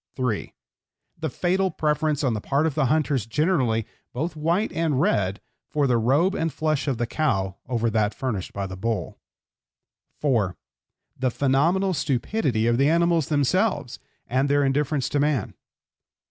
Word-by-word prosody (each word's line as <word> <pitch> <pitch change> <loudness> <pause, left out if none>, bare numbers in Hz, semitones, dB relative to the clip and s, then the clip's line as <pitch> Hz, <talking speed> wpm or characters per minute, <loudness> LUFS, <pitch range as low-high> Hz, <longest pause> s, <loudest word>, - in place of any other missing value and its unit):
(3) 125 -5 -2 0.7
The - - -2
fatal 190 +2 +1
preference 150 -2 0
on 130 -4 +2
the 105 - -3
part 140 +7 +1
of 160 - 0
hunters 140 -4 +1
generally, 125 - +1 0.3
both 155 +6 -3
white 170 +7 0
and 160 -5 0
red, 100 - +1 0.3
for 150 -1 +1
the 125 -3 +2
robe 145 +12 +3
and 165 0 -1
flesh 155 -2 -1
of 135 -4 0
the 120 - 0
cow 100 - -1
over 120 -2 0
that 105 -1 +1
furnished 110 -9 -3
by 100 0 -4
the 95 -1 -6
bull. 100 -2 -3 1.0
(4) 115 -11 +1 0.6
The 130 0 +1
phenomenal 160 +10 +2
stupidity 135 - 0
of 120 +1 +2
the 140 +2 +4
animals 170 -2 +2
themselves, 150 - +1 0.3
and 130 +3 0
their 145 0 +3
indifference 140 0 0
to 145 - 0
man. 145 -7 0
140 Hz, 150 wpm, -24 LUFS, 120-155 Hz, 1.0 s, the